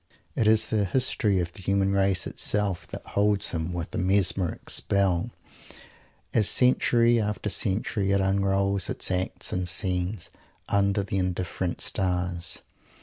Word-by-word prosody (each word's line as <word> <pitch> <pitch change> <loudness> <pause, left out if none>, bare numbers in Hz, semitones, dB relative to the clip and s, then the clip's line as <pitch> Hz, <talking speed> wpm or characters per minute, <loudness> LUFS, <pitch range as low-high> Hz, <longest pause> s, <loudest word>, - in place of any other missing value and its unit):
It 110 - +1
is 110 0 +4
the 105 -2 +1
history 105 -2 +2
of 85 -1 -3
the - - -9
human 95 +1 +1
race 95 -2 +1
itself 100 -4 -1
that - - -9
holds 100 0 +1
him 80 +1 -3
with 85 -1 -5
a - - -2
mesmeric 95 -1 +1
spell, 100 +1 +1 1.0
as 105 -4 +4
century 120 -2 +3
after 105 -1 -2
century 100 0 0
it 100 - +2
unrolls 100 0 0
its - - -2
acts 90 0 -2
and 90 -1 -1
scenes, 90 +2 -1 0.4
under 100 0 +1
the 100 0 -2
indifferent 90 -1 -3
stars. 90 -3 -1
95 Hz, 140 wpm, -26 LUFS, 90-100 Hz, 1.0 s, is